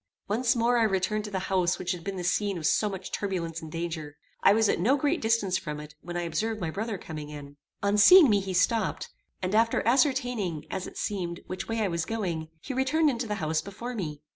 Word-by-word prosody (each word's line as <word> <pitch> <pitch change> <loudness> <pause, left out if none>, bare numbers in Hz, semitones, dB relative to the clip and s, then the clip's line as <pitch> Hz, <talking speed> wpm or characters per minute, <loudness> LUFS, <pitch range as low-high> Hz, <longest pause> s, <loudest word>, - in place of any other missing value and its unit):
Once 235 +4 +1
more 240 +1 +2
I - - +4
returned 210 +1 0
to - - -5
the 195 - -3 0.2
house 180 -1 +2
which 180 - -2
had 175 -2 -5
been 195 -1 -4
the 180 - -4
scene 200 +2 0
of 160 - -5
so 210 +6 +2
much 190 -2 -7
turbulence 170 -5 -3
and 160 -1 -9
danger. 160 -3 -5 0.2
I - - +6
was 220 +1 +4
at - - +1
no 250 +11 +3
great 290 +4 0
distance 220 -4 +1
from 150 -4 -5
it 150 0 -10
when 175 0 -5
I 175 - -1
observed 215 +7 -2
my 165 -4 -2
brother 215 +3 -3
coming 155 -4 -7
out. 145 -1 -9 0.3
On 200 +1 +2
seeing 355 - +9
me 205 -4 +4
he 190 -1 -4
stopped, 215 +2 +1 0.3
and 185 +2 -1
after 225 +1 +2
ascertaining, 245 - +1
as 185 - -3
it - - -11
seemed, 175 -4 -3
which 185 - -5
way 225 0 -1
I 210 - +2
was 170 -2 -1
going, 175 -8 -3
he 270 - -5
returned 285 +4 +2
into 235 -1 -3
the 210 - -2
house 155 -4 -1
before 235 +5 -7
me. 155 -9 -5
195 Hz, 235 wpm, -28 LUFS, 170-225 Hz, 0.3 s, seeing